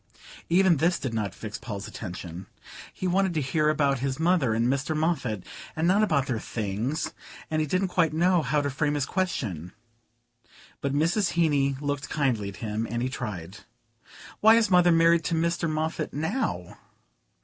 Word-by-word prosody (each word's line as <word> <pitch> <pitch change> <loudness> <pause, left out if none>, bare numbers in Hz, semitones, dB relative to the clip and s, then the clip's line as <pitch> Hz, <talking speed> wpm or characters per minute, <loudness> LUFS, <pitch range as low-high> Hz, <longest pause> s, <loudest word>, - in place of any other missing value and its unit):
'" - - -17
Even 190 -4 +5
this 170 +4 +2
did 130 -7 -4
not 105 -3 -1
fix 105 -1 -7
Paul's 105 -3 -6
attention. 90 -2 -7 0.4
He - - -6
wanted 185 0 +1
to - - +2
hear 150 +3 +1
about 140 -3 +2
his 135 +1 -2
mother 160 -9 +2
and 115 +1 +2
Mr. 140 +4 0
Moffatt, 155 - -1 0.3
and 160 +2 +1
not 195 +4 +4
about 155 -11 +2
their 125 -5 -2
things; 110 +8 -3 0.4
and 155 0 +1
he 155 - -1
didn't 185 +5 0
quite 165 -3 +2
know 175 +2 +3
how 145 +1 +1
to 145 - -1
frame 150 +1 0
his 145 -2 0
question. 105 - -3 1.1
But 140 0 -1
Mrs. 175 +6 +1
Heeny 145 -5 +2
looked 145 -1 -3
kindly 125 -9 0
at 100 - -9
him 110 +2 -2
and 120 +1 -2
he 130 - -1
tried. 95 -7 -6 0.8
"Why 220 +1 +7
is 230 -3 +2
mother 180 -1 +6
married 165 0 +4
to 165 - 0
Mr. 170 0 0
Moffatt 155 +1 -2
now?" 160 - -2
150 Hz, 175 wpm, -26 LUFS, 120-170 Hz, 1.1 s, Why